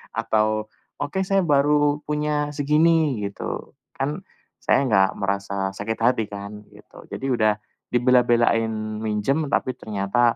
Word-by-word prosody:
atau 110 0 0 0.3
oke 170 +7 -1
saya 195 0 +3
baru 145 -1 +3
punya 150 0 -1
segini," 150 -4 +2
gitu, 100 - -6 0.2
kan 145 +4 -2 0.4
saya - - +2
enggak 95 -4 +4
merasa 100 -1 -2
sakit 110 +3 -3
hati 115 -1 +2
kan, 100 +1 -8
gitu. - - -16
Jadi - - -5
udah 110 -3 +3 0.4
dibela-belain 115 -3 +2
minjam, 110 +9 0
tapi 130 - 0
ternyata 110 +3 +1
120 Hz, 120 wpm, -23 LUFS, 105-145 Hz, 0.4 s, enggak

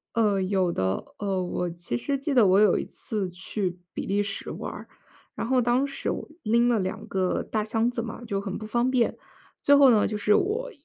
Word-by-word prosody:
呃， 210 -4 +2
有 185 -1 +1
的， 95 - -1
呃， 195 -2 -1
我 180 0 -2
其 170 -7 -4
实 280 - -1
记 275 +2 -2
得 240 -5 +6
我 190 +2 +5
有 210 -3 +5
一 - - -3
次 205 -4 -4
去 180 0 -4 0.2
比 - - -5
利 200 +1 +1
时 200 -1 -5
玩 - - -5
儿， - - -9 0.5
然 - - -3
后 255 +2 +2
当 245 +3 +2
时 275 0 -4
我 - - -3 0.2
拎 235 +2 +3
了 235 -2 +3
2 185 -1 -3
个， 185 -1 0
大 215 -1 -2
箱 225 +2 +1
子 245 - -3
嘛， 230 0 -6
就 200 -4 -2
很 195 -1 -4
不 215 - -7
方 235 +3 +1
便。 255 -3 +1 0.4
最 285 - +5
后 280 -2 +7
呢， 215 -3 +4
就 210 - -2
是 210 0 +2
我 470 +6 0
215 Hz, 230 characters per minute, -26 LUFS, 190-240 Hz, 0.5 s, 后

